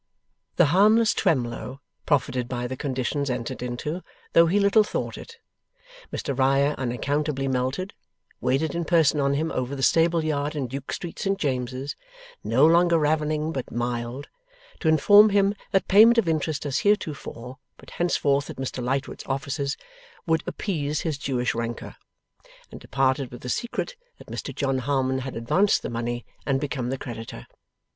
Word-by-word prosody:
The 175 - +5
harmless 215 +4 +5
Twemlow 130 -1 -1 0.3
profited 130 -4 +1
by 125 -1 -3
the 130 +1 -4
conditions 135 +1 -2
entered 125 0 -4
into, 125 +8 -4 0.3
though 165 0 +6
he 195 +5 +2
little 200 +2 +5
thought - - -3
it. 465 - -11 0.7
Mr 140 - -3
Riah 135 +2 +3
unaccountably 135 +3 -1
melted; 130 +9 -2 0.5
waited 135 +5 0
in 170 0 -1
person 160 -3 +3
on 140 0 +2
him 160 +3 -1
over 130 +2 -2
the 135 - -4
stable 165 +1 +3
yard 150 0 -1
in 140 -3 -1
Duke 135 +2 -6
Street, 170 - -6
St 195 -1 0
James's, 130 -3 -2 0.5
no 115 +7 +4
longer 170 +1 +5
ravening 155 0 0
but 135 -5 -4
mild, 120 +2 -3 0.5
to 165 - -2
inform 205 +8 +7
him 200 0 +3 0.2
that 195 - +1
payment 225 +4 +7
of 225 -6 +3
interest 155 -2 -1
as 140 -2 0
heretofore, 140 - -2 0.2
but - - -15
henceforth 145 -5 +1
at - - -6
Mr 130 -1 -4
Lightwood's 135 +3 -3
offices, 140 0 -2 0.5
would 160 -1 +2
appease 150 -6 -2
his 155 -4 -3
Jewish 130 -3 -1
rancour; 115 0 -5 0.8
and - - -10
departed 130 0 0
with 120 0 -10
the 125 - -6
secret 240 - -3 0.2
that - - -15
Mr - - -5
John 135 -2 0
Harmon 130 0 0
had 130 0 -6
advanced 180 - +2
the - - -4
money 120 +1 -3 0.2
and 135 -1 0
become 135 -4 -3
the 135 - -2
creditor. 115 - -8
140 Hz, 160 wpm, -25 LUFS, 130-165 Hz, 0.8 s, inform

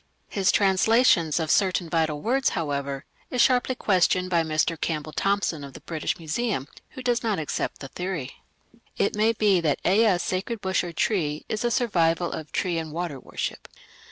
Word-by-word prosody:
His 195 -2 +2
translations 190 - +3
of 160 -2 0
certain 185 -3 +2
vital 160 -2 0
words, 265 +3 +2
however, 140 -3 -3 0.2
is 250 - -3
sharply 255 +1 +3
questioned 185 -3 +2
by 170 -1 +4
Mr. 155 +1 +1
R. 165 - -7
Campbell 155 0 -3
Thompson 195 -5 0
of 140 -1 -9
the - - -10
British 160 -2 -3
Museum, 165 - -2 0.3
who 260 - -6
does 245 -1 +1
not 220 -4 0
accept 155 - -3
the 135 - -6
theory. 175 -4 -5 0.6
It 200 - +1
may 215 +2 +3
be 205 -5 +3
that 150 -4 +1
Ea's 195 -2 +4
sacred 200 +5 -2
bush 190 -2 0
or 175 - -5
tree 160 -4 -1
is 215 +1 -2
a 240 - +2
survival 175 -8 +1
of 155 -2 -6
tree 175 -3 0
and 160 -1 -6
water 165 -4 -4
worship. - - -5
180 Hz, 180 wpm, -25 LUFS, 155-210 Hz, 0.6 s, by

